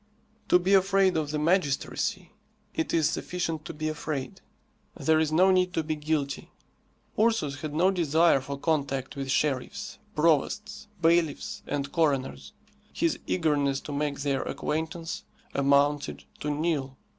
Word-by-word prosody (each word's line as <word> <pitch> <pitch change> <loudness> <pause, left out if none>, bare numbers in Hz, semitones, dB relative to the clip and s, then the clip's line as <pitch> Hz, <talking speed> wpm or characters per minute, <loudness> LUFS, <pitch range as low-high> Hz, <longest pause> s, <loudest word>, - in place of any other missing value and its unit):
To - - +7
be 185 +2 +1
afraid 195 -1 +4
of 155 -2 0
the 150 - -1
magistracy, 175 +3 0 0.4
it 160 - -1
is 160 -3 +3
sufficient 165 -3 -3
to - - -5
be 155 +1 -3
afraid, 150 -4 -4 0.6
there 160 0 +3
is 155 -1 +1
no 185 +4 +5
need 185 0 +2
to 160 - +1
be 155 0 -2
guilty. 150 -2 -2 0.7
Ursus 215 -12 +1
had 150 -1 -4
no 180 +4 +4
desire 165 -4 +3
for 140 +1 -5
contact 140 -3 -1
with 135 -1 -4
sheriffs, 135 -2 -1 0.2
provosts, 165 +8 +1 0.2
bailiffs, 165 -3 +2
and 140 -1 -2
coroners. 135 - 0 0.4
His - - 0
eagerness 140 +6 +1
to - - -7
make 145 0 -2
their 140 -2 0
acquaintance 160 +2 -3 0.3
amounted 140 +1 +2 0.2
to 150 - -3
nil. 145 -3 -1
155 Hz, 140 wpm, -27 LUFS, 140-170 Hz, 0.7 s, To